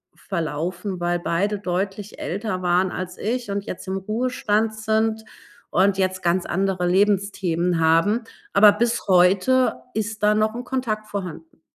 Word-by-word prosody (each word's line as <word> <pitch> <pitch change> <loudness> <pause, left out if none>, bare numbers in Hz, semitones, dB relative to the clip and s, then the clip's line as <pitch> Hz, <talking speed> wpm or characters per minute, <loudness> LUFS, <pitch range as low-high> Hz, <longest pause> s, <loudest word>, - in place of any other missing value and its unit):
verlaufen, 175 +2 -4
weil 175 0 0
beide 195 +5 -1
deutlich 195 +2 -3
älter 190 0 -3
waren 180 +1 +2
als 180 0 -5
ich 235 +1 -2
und 200 0 -2
jetzt 185 - -7
im 190 - -2
Ruhestand 220 +1 0
sind 220 +1 0 0.5
und 195 +1 +3
jetzt 185 -1 0
ganz 175 +1 +1
andere 190 -1 0
Lebensthemen 185 -3 +1
haben, 165 +9 +3 0.3
aber 205 +1 +8
bis 235 +2 -1
heute 195 +8 +3
ist 215 0 -3
da 210 0 +5
noch 215 +1 +1
'n 245 - -5
Kontakt 220 -5 -2
vorhanden. 170 -5 -7
195 Hz, 145 wpm, -23 LUFS, 180-215 Hz, 0.5 s, aber